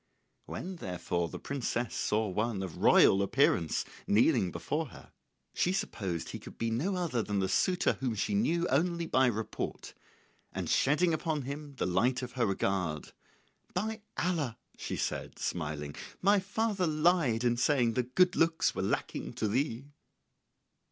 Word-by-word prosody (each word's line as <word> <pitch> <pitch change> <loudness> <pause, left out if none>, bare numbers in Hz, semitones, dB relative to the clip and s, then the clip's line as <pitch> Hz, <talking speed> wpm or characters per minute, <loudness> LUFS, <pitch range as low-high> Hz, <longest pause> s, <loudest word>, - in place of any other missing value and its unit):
When 185 0 -5
therefore 90 - -2
the - - -6
princess 125 -3 -2
saw 110 +1 0
one 105 +1 -1
of 90 -4 -6
royal 95 - +6
appearance 85 -4 +2 0.2
kneeling 115 - +4
before 155 - -2
her - - -14 0.4
she 180 - +1
supposed 95 - -3
he - - -6
could - - -12
be 115 0 -1
no 160 - 0
other 170 -10 0
than 105 -2 -2
the 95 -1 +1
suitor 180 - +2
whom 125 -4 -1
she 110 - -1
knew 175 -5 +2
only 170 +4 +1
by 130 -5 +3
report, 110 -2 -3 0.6
and - - -4
shedding 160 +5 +3
upon 155 -2 -1
him 140 +2 -6
the - - -1
light 125 +8 +1
of 125 - -5
her 120 -3 0
regard, 95 -5 -1 0.6
"By 220 0 -2 0.2
Allah," 160 -9 -1 0.2
she - - -4
said, - - -3
smiling, 75 -3 -3 0.3
"my 200 +2 +4
father 205 -1 0
lied 155 -7 +2
in 120 -1 +3
saying 120 -1 +2
that 125 +1 -2
good 180 -1 +5
looks 165 0 +2
were - - -3
lacking 95 - -2
to 110 - -1
thee!" 125 +3 -1
125 Hz, 155 wpm, -31 LUFS, 105-170 Hz, 0.6 s, royal